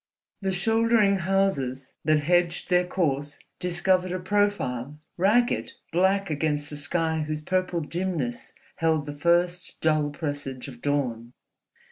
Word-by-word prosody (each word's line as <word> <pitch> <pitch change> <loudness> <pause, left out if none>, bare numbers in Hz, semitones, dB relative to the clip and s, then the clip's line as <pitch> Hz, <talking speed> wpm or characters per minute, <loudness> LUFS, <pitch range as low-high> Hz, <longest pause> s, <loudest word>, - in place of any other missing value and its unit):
The 190 -1 0
shouldering 225 +1 +3
houses 170 -9 0
that 155 -1 +3
hedged 175 +3 +1
their 180 0 +4
course 145 -5 -1 0.2
discovered 180 +1 +1
a 185 - -1
profile, 180 - 0 0.2
ragged, 220 +7 +2 0.2
black 190 +2 +2
against 150 -1 -1
a - - -5
sky 160 +2 0
whose 155 0 -3
purple 185 0 0
dimness 165 -6 -3 0.3
held 160 -2 +1
the 145 - -5
first 175 +3 +1
dull 155 -2 +2
presage 145 -4 -5
of 120 -3 -11
dawn. 125 -5 -1
165 Hz, 125 wpm, -26 LUFS, 145-185 Hz, 0.3 s, their